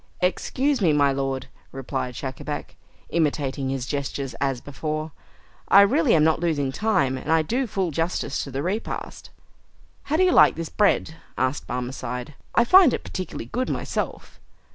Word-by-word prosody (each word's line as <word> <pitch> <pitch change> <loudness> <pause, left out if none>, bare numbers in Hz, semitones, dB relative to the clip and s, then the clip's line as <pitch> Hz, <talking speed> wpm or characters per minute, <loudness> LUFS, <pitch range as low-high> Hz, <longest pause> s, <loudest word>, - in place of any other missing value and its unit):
"Excuse 255 +8 0
me, 165 -5 +4
my 145 -1 +4
lord," 135 -1 -2 0.3
replied 125 -1 -4
Schacabac, 145 +3 -5 0.3
imitating 145 -4 0
his 135 -2 -2
gestures 140 -1 -3
as 135 -3 0
before, 155 +4 -4 0.6
"I 200 - +8
really 200 -5 +4
am 155 - +4
not 160 0 +3
losing 150 -5 0
time, 155 -9 +1
and 155 - -4
I 160 -1 +4
do 250 - -1
full 190 -4 -1
justice 165 -2 -1
to - - -7
the 135 +1 -3
repast." 200 +6 -4 0.8
"How 310 - 0
do 370 - +4
you 365 - +4
like - - +6
this 165 0 -5
bread?" 195 -5 +1 0.2
asked 130 +2 -1
the - - -4
Barmecide. 125 +1 -5 0.2
"I 235 - +6
find 355 +2 +7
it - - -7
particularly 185 - -6
good 255 - -2
myself." - - -4
150 Hz, 165 wpm, -24 LUFS, 135-185 Hz, 0.8 s, I